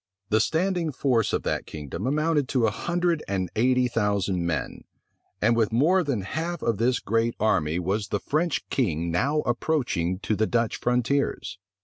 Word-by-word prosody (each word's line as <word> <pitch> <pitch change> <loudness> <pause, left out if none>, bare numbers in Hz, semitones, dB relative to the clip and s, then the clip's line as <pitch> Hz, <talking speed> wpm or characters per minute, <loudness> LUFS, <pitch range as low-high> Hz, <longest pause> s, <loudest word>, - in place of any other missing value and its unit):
The 110 - +3
standing 170 - 0
force 125 -6 +1
of - - -1
that - - -2
kingdom 80 - -5
amounted 150 0 +1
to 125 -4 +2
a 110 - +2
hundred 175 - 0
and 95 -2 -2
eighty 125 +2 +3
thousand 100 -6 0
men; 80 -3 -3 0.6
and 115 +2 +4
with 115 -2 +2
more 165 +11 +3
than 135 -9 -1
half 160 - -4
of 115 -4 0
this 125 +2 +2
great 115 +2 0
army 85 -7 +1
was 95 +4 -1
the 105 - -1
French 160 - -1
king 85 - 0
now 140 - +1
approaching 120 - 0
to 110 - 0
the 110 +1 +1
Dutch 115 -2 0
frontiers. 125 -5 0
115 Hz, 165 wpm, -25 LUFS, 100-145 Hz, 0.6 s, and